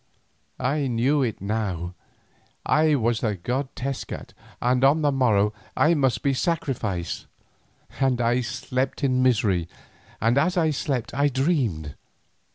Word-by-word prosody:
I 140 Hz, +2 st, 0 dB
knew 130 Hz, +5 st, +2 dB
it 115 Hz, -7 st, -2 dB
now, 100 Hz, -4 st, -2 dB, 0.7 s
I 155 Hz, 0 st, +3 dB
was 115 Hz, -3 st, +1 dB
the 110 Hz, -4 st, 0 dB
god 125 Hz, +9 st, -2 dB
Tezcat, 135 Hz, +1 st, -5 dB, 0.3 s
and 125 Hz, +1 st, +1 dB
on 145 Hz, +3 st, +4 dB
the 145 Hz, -, +3 dB
morrow 110 Hz, -6 st, +2 dB, 0.2 s
I 160 Hz, -, +4 dB
must 135 Hz, -6 st, +1 dB
be 140 Hz, -, +2 dB
sacrificed, 125 Hz, -, -2 dB, 0.7 s
and 130 Hz, -2 st, +2 dB
I 120 Hz, +1 st, +2 dB
slept 130 Hz, +3 st, -3 dB
in 130 Hz, -2 st, +2 dB
misery, 100 Hz, -9 st, +2 dB, 0.5 s
and 115 Hz, +5 st, +3 dB
as 180 Hz, +5 st, +1 dB
I 160 Hz, -2 st, +3 dB
slept 135 Hz, -4 st, -2 dB
I 140 Hz, +3 st, +2 dB
dreamed. 130 Hz, -, 0 dB
130 Hz, 135 wpm, -24 LUFS, 110-140 Hz, 0.7 s, on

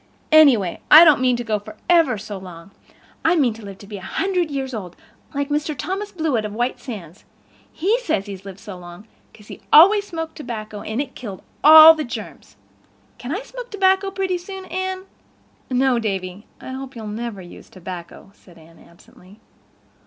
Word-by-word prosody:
Anyway, 265 Hz, -, +5 dB
I 315 Hz, +3 st, +10 dB
don't 300 Hz, -5 st, +5 dB
mean 255 Hz, -1 st, +2 dB
to 240 Hz, -, -4 dB
go 215 Hz, -2 st, -1 dB
for 210 Hz, +1 st, -13 dB
ever 330 Hz, -9 st, +3 dB
so 205 Hz, 0 st, -8 dB
long. 180 Hz, 0 st, -12 dB, 0.5 s
I 330 Hz, +2 st, +3 dB
mean 265 Hz, -8 st, +2 dB
to 225 Hz, -, -13 dB
live 200 Hz, -1 st, -9 dB
to 200 Hz, -, -14 dB
be 205 Hz, 0 st, -8 dB
a -, -, -10 dB
hundred 360 Hz, -, -1 dB
years 270 Hz, -2 st, -4 dB
old, 185 Hz, -6 st, -7 dB, 0.4 s
like 285 Hz, 0 st, -2 dB
Mr. 295 Hz, 0 st, -2 dB
Thomas 390 Hz, -, -4 dB
Blewett 315 Hz, -, -1 dB
of 210 Hz, -1 st, -5 dB
White 245 Hz, +3 st, -2 dB
Sands. 195 Hz, -, -9 dB, 0.5 s
He 410 Hz, +9 st, 0 dB
says 210 Hz, -, -2 dB
he's 195 Hz, -2 st, -9 dB
lived 195 Hz, -1 st, -10 dB
so 200 Hz, -5 st, -10 dB
long 175 Hz, +3 st, -12 dB, 0.3 s
'cause 210 Hz, -1 st, -18 dB
he -, -, -10 dB
always 400 Hz, +6 st, +7 dB
smoked 325 Hz, -3 st, -6 dB
tobacco 215 Hz, -6 st, -7 dB
and 220 Hz, +3 st, -4 dB
it 275 Hz, -2 st, -4 dB
killed 205 Hz, -7 st, -9 dB, 0.2 s
all 315 Hz, +1 st, +10 dB
the 315 Hz, -1 st, -4 dB
germs. 235 Hz, -, -9 dB, 0.6 s
Can 245 Hz, -, -7 dB
I 395 Hz, +9 st, -3 dB
smoke -, -, -9 dB
tobacco 385 Hz, -1 st, +2 dB
pretty 380 Hz, -2 st, -2 dB
soon, 380 Hz, +1 st, -9 dB
Anne?" 375 Hz, +1 st, -4 dB, 0.7 s
"No, 255 Hz, -1 st, +2 dB
Davy, 195 Hz, -2 st, -4 dB
I -, -, -10 dB
hope 265 Hz, 0 st, -8 dB
you'll 225 Hz, -2 st, -8 dB
never 215 Hz, 0 st, -5 dB
use 175 Hz, -, -14 dB
tobacco," 180 Hz, 0 st, -10 dB
said 175 Hz, -4 st, -20 dB
Anne 165 Hz, +1 st, -19 dB
absently. 185 Hz, +4 st, -20 dB
245 Hz, 185 wpm, -21 LUFS, 200-325 Hz, 0.7 s, I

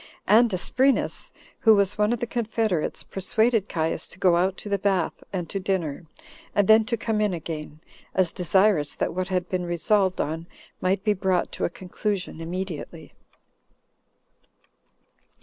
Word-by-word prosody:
And 225 Hz, +3 st, +5 dB
Asprenas, 260 Hz, +9 st, +1 dB, 0.3 s
who 220 Hz, -2 st, +6 dB
was 200 Hz, -1 st, +2 dB
one 210 Hz, +1 st, +2 dB
of 240 Hz, -, 0 dB
the 240 Hz, -, -1 dB
confederates, 225 Hz, -7 st, -1 dB
persuaded 220 Hz, +2 st, 0 dB
Caius 160 Hz, -1 st, -1 dB
to -, -, -9 dB
go 185 Hz, -2 st, +4 dB
out 185 Hz, +2 st, +1 dB
to -, -, -9 dB
the 200 Hz, -1 st, 0 dB
bath, 190 Hz, -3 st, 0 dB
and 180 Hz, -3 st, -3 dB
to 195 Hz, -, -2 dB
dinner, 180 Hz, -5 st, -2 dB, 0.5 s
and 205 Hz, -2 st, +3 dB
then 220 Hz, 0 st, +6 dB
to 235 Hz, +1 st, -1 dB
come 220 Hz, -2 st, -1 dB
in 205 Hz, -4 st, +1 dB
again, 155 Hz, -2 st, -7 dB, 0.3 s
as 185 Hz, -3 st, +2 dB
desirous 180 Hz, -3 st, +2 dB
that -, -, -1 dB
what 185 Hz, +1 st, -2 dB
had 180 Hz, -2 st, -1 dB
been 180 Hz, -1 st, -2 dB
resolved 190 Hz, +2 st, +1 dB
on 160 Hz, +3 st, -2 dB, 0.3 s
might 190 Hz, +1 st, +1 dB
be 210 Hz, -1 st, +3 dB
brought 190 Hz, -2 st, 0 dB
to -, -, -2 dB
a -, -, 0 dB
conclusion 185 Hz, -1 st, -4 dB
immediately. 175 Hz, -1 st, -6 dB
190 Hz, 155 wpm, -25 LUFS, 175-210 Hz, 0.5 s, who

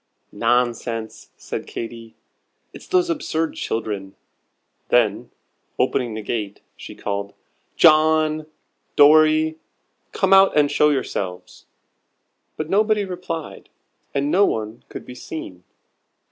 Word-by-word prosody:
"Nonsense," 115 Hz, 0 st, -1 dB
said -, -, -6 dB
Katy, 115 Hz, -1 st, -8 dB, 0.6 s
"it's -, -, -12 dB
those 365 Hz, -1 st, +2 dB
absurd 165 Hz, -, -2 dB
children." 100 Hz, -4 st, -4 dB, 0.7 s
Then, 110 Hz, -4 st, +2 dB, 0.5 s
opening 120 Hz, -3 st, 0 dB
the 110 Hz, -, -5 dB
gate, 105 Hz, -3 st, -4 dB
she -, -, -10 dB
called: 100 Hz, 0 st, -4 dB, 0.4 s
"John! 155 Hz, -1 st, +4 dB, 0.5 s
Dorry! 155 Hz, +1 st, +5 dB, 0.5 s
come 195 Hz, -2 st, +2 dB
out 195 Hz, -4 st, +6 dB
and 145 Hz, -1 st, +4 dB
show 150 Hz, -, +4 dB
yourselves." 100 Hz, -10 st, -4 dB, 0.9 s
But 155 Hz, -, -3 dB
nobody 210 Hz, +2 st, +2 dB
replied, 180 Hz, -4 st, -6 dB, 0.4 s
and 140 Hz, +1 st, -1 dB
no 200 Hz, -, +4 dB
one 110 Hz, -, -2 dB
could -, -, -9 dB
be 125 Hz, -, -9 dB
seen. 125 Hz, -, -8 dB
145 Hz, 105 wpm, -21 LUFS, 110-160 Hz, 0.9 s, out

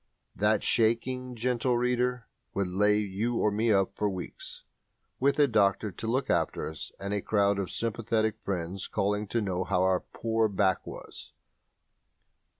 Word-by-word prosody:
That -, -, +2 dB
"shaking", 125 Hz, +3 st, +1 dB
gentle 125 Hz, +1 st, +1 dB
reader, 125 Hz, -1 st, 0 dB, 0.3 s
would 100 Hz, -, +1 dB
lay 105 Hz, +3 st, +3 dB
you 105 Hz, +3 st, -1 dB
or 105 Hz, -, +2 dB
me 110 Hz, +2 st, +1 dB
up 95 Hz, -2 st, +2 dB
for 105 Hz, -, 0 dB
weeks, 90 Hz, -2 st, -7 dB, 0.6 s
with 140 Hz, +1 st, +2 dB
a 145 Hz, -1 st, +5 dB
doctor 105 Hz, -2 st, +2 dB
to 105 Hz, +5 st, -6 dB
look 130 Hz, +4 st, 0 dB
after -, -, 0 dB
us 80 Hz, -2 st, -6 dB
and 100 Hz, +1 st, -3 dB
a 100 Hz, -, 0 dB
crowd 100 Hz, -1 st, +2 dB
of 95 Hz, -, -2 dB
sympathetic 110 Hz, -1 st, -1 dB
friends 95 Hz, -1 st, -3 dB
calling 105 Hz, +1 st, -1 dB
to 115 Hz, +3 st, 0 dB
know 95 Hz, -3 st, -1 dB
how 95 Hz, -1 st, +1 dB
our 95 Hz, -1 st, +3 dB
poor 115 Hz, -1 st, -1 dB
back 95 Hz, -2 st, +1 dB
was. -, -, -10 dB
105 Hz, 155 wpm, -29 LUFS, 100-115 Hz, 0.6 s, a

